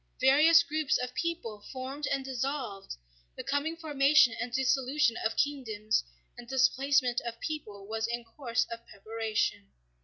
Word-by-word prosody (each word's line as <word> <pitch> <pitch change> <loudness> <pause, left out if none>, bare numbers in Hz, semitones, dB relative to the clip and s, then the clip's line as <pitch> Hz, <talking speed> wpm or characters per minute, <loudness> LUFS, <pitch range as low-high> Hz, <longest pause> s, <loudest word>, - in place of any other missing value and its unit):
Various 310 +6 +6
groups 305 -1 0
of 250 0 -4
people 285 -12 -3
formed 270 +3 -5
and 270 -1 -1
dissolved, 260 - -4 0.4
the - - -5
coming 305 +4 -1
formation 290 -5 +4
and 240 +1 -3
dissolution 265 0 +2
of 220 - -1
kingdoms 220 -7 0 0.3
and 240 - -11
displacement 265 0 +2
of 235 -1 -6
peoples 210 -11 -6
was 220 +1 -2
in 235 0 -3
course 230 -1 -2
of 230 0 -7
preparation. 215 - -2
260 Hz, 140 wpm, -30 LUFS, 225-285 Hz, 0.4 s, Various